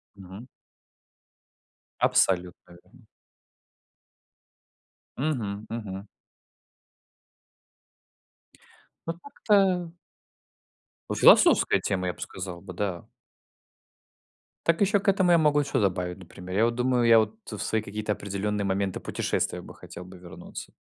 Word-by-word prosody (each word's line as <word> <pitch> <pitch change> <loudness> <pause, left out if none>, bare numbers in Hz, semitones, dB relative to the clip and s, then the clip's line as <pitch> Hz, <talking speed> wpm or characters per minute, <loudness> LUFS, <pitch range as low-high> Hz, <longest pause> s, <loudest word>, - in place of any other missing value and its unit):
Мгм. 100 +5 -11 1.5
Абсолютно 90 -1 +1
верно. - - -22 2.1
Мгм, 110 -8 -2
мгм. 100 -3 -6 3.0
Ну, 165 - -1
так-то 190 -5 +1 1.2
Ну, - - -2
философская - - +6
тема, 95 -2 -2
я 90 - -1
б - - -21
сказал 90 -2 -6
бы, 90 - -9
да. 90 -2 -4 1.6
Так 170 +3 +2
еще 200 +1 +3
к 200 - -9
этому 190 -2 +3
я 170 - +6
могу 150 -2 +3
что 140 -1 -1
добавить, 90 -3 -1
например. 90 0 -9
Я 115 - +4
вот 120 - +1
думаю, 125 0 +1
я 115 -1 +7
вот 110 0 -1 0.2
в 105 - -6
свои 110 -1 -1
какие-то 105 +1 -3
определенные 100 +1 -3
моменты 95 0 -1
путешествия - - -2
бы - - -12
хотел 90 - -11
бы 90 0 -12
вернуться. 90 -1 -10
105 Hz, 110 wpm, -26 LUFS, 95-135 Hz, 3.0 s, я